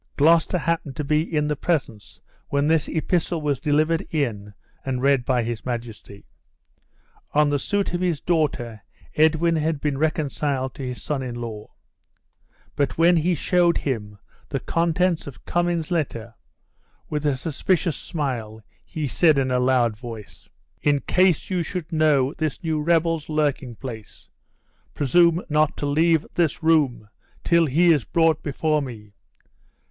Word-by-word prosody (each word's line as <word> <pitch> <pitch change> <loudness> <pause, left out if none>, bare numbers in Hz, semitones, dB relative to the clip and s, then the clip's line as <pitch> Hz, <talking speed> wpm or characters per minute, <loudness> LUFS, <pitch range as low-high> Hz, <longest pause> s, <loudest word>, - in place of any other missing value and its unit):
Gloucester 165 +4 +4
happened 165 -4 -2
to 150 - -3
be 150 +2 +2
in 155 -2 -1
the 150 - 0
presence 135 -10 -3 0.3
when 140 0 +1
this 160 0 +2
epistle 170 +1 -1
was 145 -4 -1
delivered 155 +3 +1
in 110 -10 -2 0.3
and 130 -2 -2
read 140 -2 +3
by 125 -2 +1
his 115 -1 -4
majesty. 115 -4 -7 1.1
On 150 0 +4
the 145 - +1
suit 200 +4 -1
of 175 - -1
his 175 -5 0
daughter, 140 - -1 0.3
Edwin 160 +2 +3
had 155 -1 -1
been 140 -2 -2
reconciled 145 -3 -1
to - - -9
his 125 -5 -5
son 145 -3 -2
in 125 -2 -5
law; 115 -3 -7 1.1
but 140 -1 -1
when 170 +2 +5
he 170 +2 +2
showed 175 0 +2
him 105 -7 -3 0.3
the 135 - -2
contents 170 +3 0
of 140 - -11
Cummin's 175 -2 -1
letter, 120 -9 -2 0.7
with 150 -1 -3
a 145 -2 +1
suspicious 165 +4 -1
smile 120 -9 -4 0.2
he 155 -2 -4
said 155 +3 +3
in 130 -1 +1
a 125 - +2
loud 125 -3 +2
voice, 115 -2 -10 0.3
"In 145 -1 +2
case 185 -1 +2
you 180 -2 +1
should 170 0 -5
know 150 -3 +3
this 155 +2 -3
new 160 -2 -1
rebel's 165 -1 +1
lurking 145 -5 -1
place, 110 -4 -10 0.7
presume 170 +5 +3
not 150 -1 +1
to - - -3
leave 160 +2 +2
this 170 0 0
room 145 -9 +2 0.4
till 170 -1 +3
he 165 +5 +4
is 145 -6 0
brought 160 +1 +2
before 150 +1 0
me. 110 -6 -9
150 Hz, 150 wpm, -23 LUFS, 130-165 Hz, 1.1 s, when